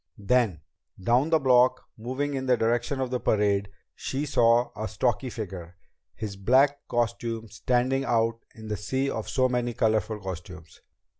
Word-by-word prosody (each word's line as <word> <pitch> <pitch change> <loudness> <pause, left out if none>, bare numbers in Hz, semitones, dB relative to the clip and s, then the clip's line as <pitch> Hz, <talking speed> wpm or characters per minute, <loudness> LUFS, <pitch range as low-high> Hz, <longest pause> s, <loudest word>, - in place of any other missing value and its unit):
Then, 105 - +1 0.4
down 120 +10 +2
the 165 - +5
block, 130 -2 +4
moving 130 +6 -3
in 130 -1 -3
the 125 -1 +4
direction 120 +4 0
of 130 -1 -2
the 125 - 0
parade, 100 -3 +1 0.2
she 140 +3 -3
saw 120 -3 +3
a 110 +1 -3
stocky 120 +4 -1
figure, 90 -6 -7 0.4
his 105 -3 -5
black 135 +8 +3
costume 115 -1 -2
standing 125 +4 0
out 115 -2 +1 0.2
in 110 -1 -10
the 105 -1 -2
sea 130 +7 -1
of - - -4
so 130 -1 +2
many 120 -2 -1
colorful 110 -1 +1
costumes. 90 -3 -9
120 Hz, 155 wpm, -27 LUFS, 105-130 Hz, 0.4 s, the